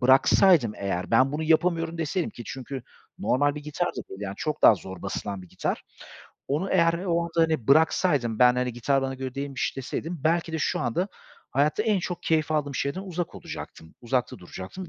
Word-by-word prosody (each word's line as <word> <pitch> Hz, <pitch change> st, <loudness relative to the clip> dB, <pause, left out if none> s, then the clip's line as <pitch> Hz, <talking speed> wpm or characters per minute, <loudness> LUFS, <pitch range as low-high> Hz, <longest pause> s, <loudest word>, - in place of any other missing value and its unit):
bıraksaydım, 130 Hz, -, +5 dB
eğer, 95 Hz, -1 st, -3 dB
ben 130 Hz, +4 st, +4 dB
bunu 150 Hz, +2 st, -2 dB
yapamıyorum 165 Hz, +1 st, +1 dB
deseydim 165 Hz, +3 st, -1 dB
ki, 120 Hz, -, -9 dB
çünkü 130 Hz, 0 st, -6 dB, 0.4 s
normal 140 Hz, +6 st, +2 dB
bir 150 Hz, -, -6 dB
gitar 150 Hz, +4 st, -2 dB
da -, -, -5 dB
değil, 95 Hz, -, -9 dB
yani, 100 Hz, -1 st, -4 dB
çok 155 Hz, -1 st, -3 dB
daha 110 Hz, -, +9 dB
zor 95 Hz, -1 st, -9 dB
basılan 100 Hz, 0 st, -4 dB
bir 90 Hz, -, -14 dB
gitar. -, -, -3 dB, 0.7 s
Onu 155 Hz, +8 st, -1 dB
eğer 170 Hz, -2 st, +4 dB
o 170 Hz, -1 st, +2 dB
anda, 170 Hz, -, -7 dB
hani, 160 Hz, -8 st, 0 dB
bıraksaydım, 140 Hz, -5 st, +3 dB
ben, 125 Hz, 0 st, +6 dB
hani, 125 Hz, -1 st, -1 dB
gitar 135 Hz, +3 st, +1 dB
bana 135 Hz, 0 st, -2 dB
göre 130 Hz, 0 st, -5 dB
değilmiş 140 Hz, -1 st, -3 dB
deseydim, 160 Hz, +5 st, -4 dB
belki 165 Hz, 0 st, +1 dB
de 160 Hz, -, -1 dB
şu -, -, 0 dB
anda 175 Hz, -, -1 dB, 0.4 s
hayatta 150 Hz, +8 st, +2 dB
en 215 Hz, -3 st, +2 dB
çok 180 Hz, -1 st, -4 dB
keyif 155 Hz, -1 st, +1 dB
aldığım 145 Hz, -3 st, -1 dB
şeyden 140 Hz, +8 st, -2 dB
uzak 180 Hz, -3 st, -4 dB
olacaktım, 80 Hz, 0 st, -9 dB
uzakta 125 Hz, +1 st, -1 dB
duracaktım 95 Hz, -, -8 dB
145 Hz, 190 wpm, -26 LUFS, 125-165 Hz, 0.7 s, daha